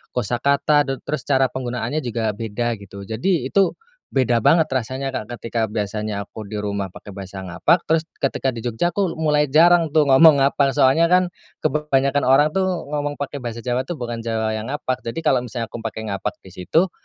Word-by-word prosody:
kosakata 140 +5 +2
te 135 - -1
terus 150 - -2
cara 135 -2 +3
penggunaannya 125 +3 -3
juga 115 -3 -2
beda, 115 +2 -2
gitu. 100 -1 -11
Jadi 130 - 0
itu 195 +6 +3 0.4
beda 120 -4 +2
banget 160 +3 +5
rasanya, 130 0 -3
Kak, 110 0 -5
ketika 115 -2 -2
biasanya 105 -1 -3
aku 110 - -9
di 105 +1 -5
rumah 100 -2 -3
pakai 100 - -11
bahasa 95 0 -8
ngapak 150 - +1
terus 160 0 +2 0.2
ketika 135 -1 0
di 120 - -7
Jogja, 120 +9 -1
aku 190 -4 -1
mulai 150 -2 +2
jarang, 165 +4 +5
tuh, 155 - +6
ngomong 140 +1 +6
ngapak, 140 -1 +2
soalnya, 145 +4 +4
kan, 180 0 +3 0.3
kebanyakan 145 -2 +1
orang, 145 +4 +5
tuh, 190 +3 +1 0.2
ngomong 145 -1 -2
pakai 145 0 -5
bahasa 120 -2 -6
Jawa, 125 +1 -1
tuh, 175 - -3
bukan 120 -4 -5
Jawa 110 -1 -1
yang 110 +1 -4
ngapak. 130 -2 -2
Jadi 130 +7 -5
kalau 130 - +3
misalnya 115 0 -5
aku - - -6
pakai 110 -1 -5
ngapak 100 +1 -3
di 95 - -13
situ, 160 - +1
130 Hz, 190 wpm, -21 LUFS, 110-150 Hz, 0.4 s, tuh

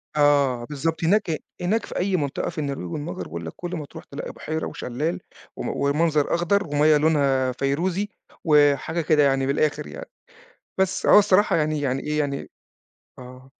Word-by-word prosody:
آه، 140 -5 +3
بالضبط، 160 +4 -3
هناك 175 -2 +2 0.2
هناك 210 +5 0
في - - -7
أي 190 +1 0
منطقة 145 -4 -2
في 165 - -11
النرويج 140 - -3
والمجر 150 - -4
باقول 85 +1 -7
لك 80 - -6
كل 175 0 -5
ما 155 -4 -5
تروح - - -11
تلاقي 140 - -7
بُحيرة 160 +1 -4
وشلال، 150 +6 -3 0.4
وم - - -4
ومنظر 145 +3 +1
أخضر، 185 +3 +1
ومَيَّة 150 +1 +4
لونها 140 -4 +2
فيروزي، 170 +10 -1 0.3
وحاجة 150 +1 +3
كده 155 -2 +3
يعني 135 -1 +2
من 135 - +1
الآخر 150 +1 0
يعني. - - -9 0.7
بس، 190 0 0
هو - - +8
الصراحة 205 0 +3
يعني 155 -2 0
يعني 135 -1 -1
إيه 150 0 -1
يعني 140 -1 -2 0.7
آه 130 +1 -12
150 Hz, 170 wpm, -24 LUFS, 140-170 Hz, 0.7 s, هو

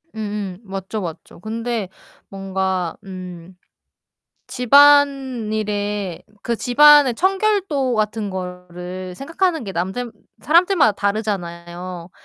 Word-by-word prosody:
음음. 205 -3 -5
맞죠, 195 +1 -5
맞죠. 165 -3 -8
근데 225 0 -3 0.4
뭔가 190 -2 -2
음 185 -2 -9 0.9
집안일에 230 - +2 0.2
그 235 - -1
집안의 290 +2 +6
청결도 375 - +1
같은 215 -1 -1
거를 180 0 -7
생각하는 330 - -1
게 195 - -6
남들 190 +7 -3 0.3
사람들마다 340 - +4
다르잖아요. 180 -4 -4
210 Hz, 210 characters per minute, -20 LUFS, 185-255 Hz, 0.9 s, 집안의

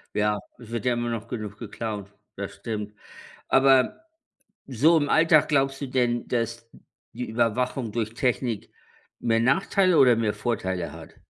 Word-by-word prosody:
Ja, 105 0 +1 0.2
es 120 - -13
wird 120 +1 -3
ja 125 - +3
immer 120 0 -2
noch 115 -1 -4
genug 105 -4 -6
geklaut. 105 -2 -5 0.3
Das 100 -1 -5
stimmt. 105 0 -5 0.6
Aber 135 -1 +4 0.7
so 145 +6 +4
im 145 -2 +1
Alltag 160 -1 +5
glaubst 135 -2 +1
du 140 - -4
denn, 120 -2 0
dass 115 -1 -3 0.4
die 125 0 -5
Überwachung 120 +1 0
durch 115 -2 -2
Technik 120 -3 -1 0.5
mehr 115 -1 +1
Nachteile 185 +7 +3
oder 125 -3 +6
mehr 110 -2 0
Vorteile 95 -7 -2
hat? - - -12
120 Hz, 150 wpm, -25 LUFS, 110-130 Hz, 0.7 s, oder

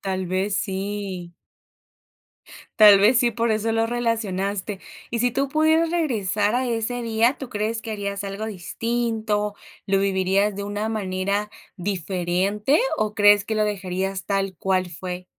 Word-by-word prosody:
Tal 190 -1 -3
vez 190 +3 -1
sí. 195 -3 -4 1.5
Tal 205 -2 +10
vez 225 +5 +5
sí, 240 -2 +3
por 230 +1 0
eso 220 +1 0
lo 225 0 +1
relacionaste. 210 -4 -2 0.3
Y 235 - -2
si 245 +2 +2
tú 275 +1 -1
pudieras 315 +2 +3
regresar 215 - 0
a 255 +1 +1
ese 240 +1 -2
día, 230 +3 +2
¿tú 265 -3 -8
crees 220 +1 -2
que 225 - -6
harías 200 -1 -3
algo 200 +2 -4
distinto? 220 +1 -2 0.3
¿Lo 195 0 +2
vivirías 195 +1 +1
de 200 - -4
una 205 +2 -3
manera 200 0 -2 0.3
diferente? 190 - 0 0.2
¿O 215 -1 -1
crees 205 -1 +5
que 220 - -3
lo 215 - +2
dejarías 190 -1 -3
tal 195 -2 -1
cual 185 -1 0
fue? 180 +1 -6
205 Hz, 150 wpm, -23 LUFS, 190-225 Hz, 1.5 s, Tal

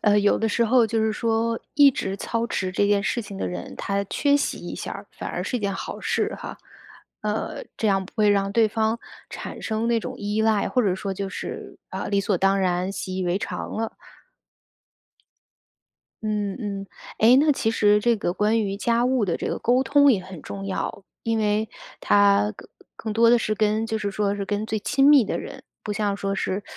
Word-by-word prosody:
呃， 210 -1 +4
有 205 - +3
的 225 - +1
时 235 +2 +2
候 235 0 +4
就 225 +1 0
是 220 0 +2
说 230 0 0 0.2
一 285 -1 +7
直 195 -6 -3
操 230 +3 -2
持 185 -5 -2
这 200 +2 +1
件 205 -1 +2
事 235 +3 -1
情 200 -1 -9
的 - - -2
人， 90 0 -6
他 200 0 -1
缺 285 +8 +2
席 285 - -1
一 - - -7
下， - - -6
反 - - -6
而 - - -3
是 250 - -2
一 - - -4
件 200 -1 -1
好 - - -6
事 - - 0
哈。 - - -7 0.7
呃， 210 +1 -3
这 220 - 0
样 195 -1 +2
不 - - -15
会 215 -2 +3
让 200 -1 +1
对 225 0 +4
方 220 +1 0 0.3
产 - - -7
生 220 +1 -1
那 235 -1 +3
种 - - -5
依 210 +2 -1
赖， 220 -2 +2
或 250 - +2
者 195 -4 +2
说 195 +1 -4
就 195 +1 -4
是， 195 - -7
啊， - - -4
理 200 -1 +1
所 195 -1 0
当 195 +1 +3
然， 180 +1 0
习 185 -1 -5
以 185 - -1
为 175 +1 +1
常 - - -5
了。 225 0 -3 2.3
嗯， 210 -2 -2
嗯。 200 -4 -4 0.3
哎， 235 +4 +6
那 300 +1 +4
其 255 -5 0
实 210 -2 +4
这 235 +1 +2
个 175 - -1
关 215 +4 +2
于 195 -2 -2
家 235 +3 +1
务 255 -4 +2
的 175 - -1
这 - - -3
个 - - -2
沟 250 +2 +2
通 285 +1 +5
也 190 -4 0
很 185 -3 -10
重 195 0 -6
要， 195 +1 -3 0.2
因 225 -1 0
为 215 0 +1 0.3
它 205 0 +4
更 - - -13 0.3
更 220 -1 -4
多 230 +1 +4
地 240 +1 +6
是 215 -1 -1
跟 215 +1 +1
就 220 0 -2
是 205 -1 -2
说 200 0 0
是 200 -1 -3
跟 205 +1 -1
最 220 - -1
亲 270 +6 +3
密 285 -6 +7
的 - - -2
人， 270 -1 -8 0.2
不 210 - -3
像 205 -1 -1
说 195 0 -2
是 195 +1 -2
210 Hz, 235 characters per minute, -24 LUFS, 200-230 Hz, 2.3 s, 一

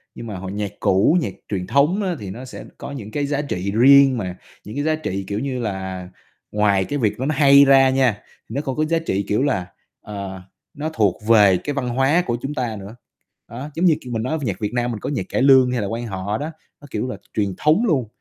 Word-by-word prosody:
nhưng 115 - -8
mà 100 - -5
hồi 95 +1 -6
nhạc 100 -1 -3
cũ, 100 - +3
nhạc 100 - -3 0.2
truyền 90 -3 -3
thống 150 +9 +2
á 180 -2 -1
thì 100 - -7
nó 125 +6 -8
sẽ 130 - -9
có 140 - -7
những 110 -6 -7
cái 145 -1 -1
giá 145 0 -1
trị 100 -9 -3
riêng 135 +1 +6
mà, 90 -4 -4 0.3
những 105 - -9
cái 145 - -1
giá 155 0 +1
trị, 100 -11 -4
kiểu 100 +1 -2
như 130 -2 -3
là, 95 -4 -4 0.4
ngoài 100 -2 +2
cái 145 0 -3
việc 110 0 0
nó 130 - -1
nó 155 0 0
hay 140 0 +7
ra 135 -1 +6
nha, 130 -6 +1 0.3
nó 135 +6 -2
còn 135 -3 -4
có 155 0 +1
giá 165 +1 +1
trị, 100 -11 -2
kiểu 105 +6 +1
là, 95 -11 -1 0.3
ờ, 100 -2 -7 0.3
nó 155 +2 -4
thuộc 105 - +2
về 105 -5 +6
cái 145 - -4
văn 130 -3 -2
hóa 135 +8 +2
của 120 -1 -1
chúng 145 +2 -4
ta 120 -6 -2
nữa. 100 +3 -10 0.5
Đó, 130 +6 -7
giống 175 +3 +1
như 165 - +5
kiểu, 125 -2 -7
mình 110 - -1
nói 155 +6 -1
nhạc 100 -8 -3
Việt 105 +1 -3
Nam 120 0 0
mình 110 - -5
có - - -4
nhạc 145 - -2
cải - - 0
lương 130 -2 +6
hay 125 -3 -1
là 100 - -2
quan 115 +3 -4
họ 100 +1 -3
đó, 150 +5 -4 0.3
nó, 145 - -12
kiểu 110 +4 -2
là, - - -5 0.2
truyền 100 -3 -1
thống 160 +10 +3
luôn, 135 - +1
120 Hz, 255 wpm, -21 LUFS, 100-140 Hz, 0.5 s, hay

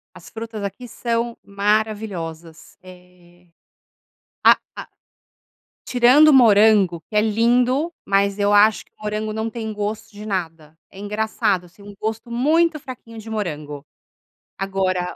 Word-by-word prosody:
As - - -13
frutas 225 -2 -7
aqui 220 +5 -6
são 235 0 -2
maravilhosas. 200 -6 -3
Eh, 180 -1 -18 1.0
a - - +7 0.2
a - - -8 1.0
Tirando 250 +5 +5
o 305 - +6
morango, 210 -7 +5
que 215 - -5
é 210 - +6
lindo, 245 +8 +1
mas 200 0 +1
eu 205 0 +2
acho 210 +1 +4
que - - -35
o - - -22
morango 215 0 -3
não 220 +1 -3
tem 220 -2 -5
gosto 215 +2 -4
de 210 +1 -10
nada. 165 -6 -5
É 195 - -15
engraçado, 210 -2 -1
assim, 200 +3 -14
gosto 220 +2 -4
muito 310 +6 +2
fraquinho 245 -4 -11
de 220 - -10
morango. 150 -9 -5 0.7
Agora 190 -2 -2
210 Hz, 135 wpm, -21 LUFS, 190-230 Hz, 1.0 s, a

